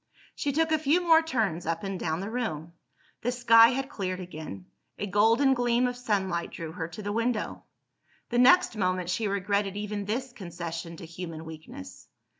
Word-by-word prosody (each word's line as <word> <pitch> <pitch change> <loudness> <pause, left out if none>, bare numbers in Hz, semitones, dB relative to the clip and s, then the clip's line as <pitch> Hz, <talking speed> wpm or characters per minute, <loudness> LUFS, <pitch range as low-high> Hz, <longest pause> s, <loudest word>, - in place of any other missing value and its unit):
She 285 - -2
took 320 +3 +1
a 315 - +3
few 305 +3 +3
more 330 -2 +5
turns 215 - -1
up 165 +2 -2
and 195 -2 -3
down 160 +1 -2
the 200 +3 -5
room. 170 -10 -3 0.5
The 245 - 0
sky 230 -2 +7
had 265 +2 -1
cleared 185 -9 -4
again; 155 - -8 0.3
a - - -3
golden 225 +7 +4
gleam 245 0 +2
of 245 0 -1
sunlight 195 -8 -1
drew 165 -2 -7
her 160 -1 -4
to 175 +5 -9
the 205 - -2
window. 230 +1 -2 0.6
The 240 - +1
next 260 +3 +6
moment 185 -3 0
she 215 +3 0
regretted 200 0 -1
even 205 -1 -4
this 245 +5 -3
concession 170 -4 -6
to - - -9
human 165 -1 -7
weakness. 155 -13 -10
205 Hz, 180 wpm, -28 LUFS, 170-245 Hz, 0.6 s, sky